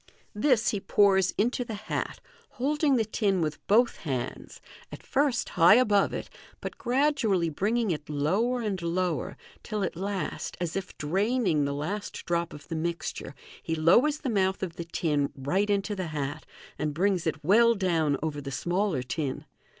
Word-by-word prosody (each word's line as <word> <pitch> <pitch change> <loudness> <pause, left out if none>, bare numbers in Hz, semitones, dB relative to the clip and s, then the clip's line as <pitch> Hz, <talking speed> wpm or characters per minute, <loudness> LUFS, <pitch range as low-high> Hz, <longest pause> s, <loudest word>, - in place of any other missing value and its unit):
This 230 +1 +2
he 205 - -1
pours 195 -1 +3
into 245 +4 +1
the 230 -2 -6
hat, 215 +1 -4 0.3
holding 290 +2 +1
the 225 -3 +2
tin 200 -3 0
with 155 -2 -2
both 230 +4 +4
hands, 130 -5 -5 0.3
at - - -9
first 275 -3 +1
high 175 +3 +6
above 210 -5 +3
it, - - -4 0.3
but - - -7
gradually 240 - +1
bringing 215 +6 0
it 150 -2 -4
lower 195 - +1
and 200 -5 -2
lower, 170 -2 -1 0.2
till 210 -2 -3
at - - -2
last, 195 +2 -4
as 175 -2 -3
if 195 -1 -5
draining 190 - +1
the 140 0 -2
last 195 +9 -4
drop 170 -1 -1
of 145 -1 -11
the 165 - -4
mixture, 170 +1 -4 0.3
he 160 - -2
lowers 235 - +4
the 270 - -2
mouth 190 -2 +1
of 170 -3 -4
the 170 - -5
tin 150 -4 0
right 180 +10 0
into 205 +1 0
the 185 -3 -3
hat, 150 0 -4 0.3
and 150 -1 -2
brings 185 -1 +1
it 160 -1 -2
well 230 +7 +5
down 165 -7 +1
over 150 -2 -2
the 140 - -6
smaller 175 -1 -1
tin. 135 +1 -3
190 Hz, 170 wpm, -28 LUFS, 160-215 Hz, 0.3 s, high